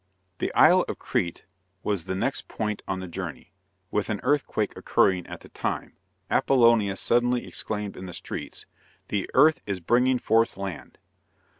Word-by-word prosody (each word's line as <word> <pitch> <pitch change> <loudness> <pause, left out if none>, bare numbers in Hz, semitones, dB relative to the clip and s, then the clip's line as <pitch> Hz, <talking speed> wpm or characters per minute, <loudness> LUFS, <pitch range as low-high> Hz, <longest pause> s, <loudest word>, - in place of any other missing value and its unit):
The - - -1
Isle - - +7
of - - -4
Crete 85 -1 -2 0.4
was 100 -6 -1
the 95 - -2
next 130 +8 -2
point 105 -2 -3
on 95 -1 -2
the 95 - -6
journey, 85 - -7 0.4
and 105 +1 0
an 105 -2 -1
earthquake 145 +2 0
occurring 90 -2 +2
at - - -8
the - - -14
time, - - -4 0.3
Apollonius 115 -7 +3
suddenly 120 +1 +2
exclaimed 105 -2 -4
in 95 - -8
the 90 - -8
streets: - - -6 0.4
"The 100 -2 -1
earth 155 +4 +6
is 100 -2 -2
bringing 125 +8 +3
forth 115 -2 +2
land." 95 -3 -6
105 Hz, 155 wpm, -26 LUFS, 95-120 Hz, 0.4 s, Isle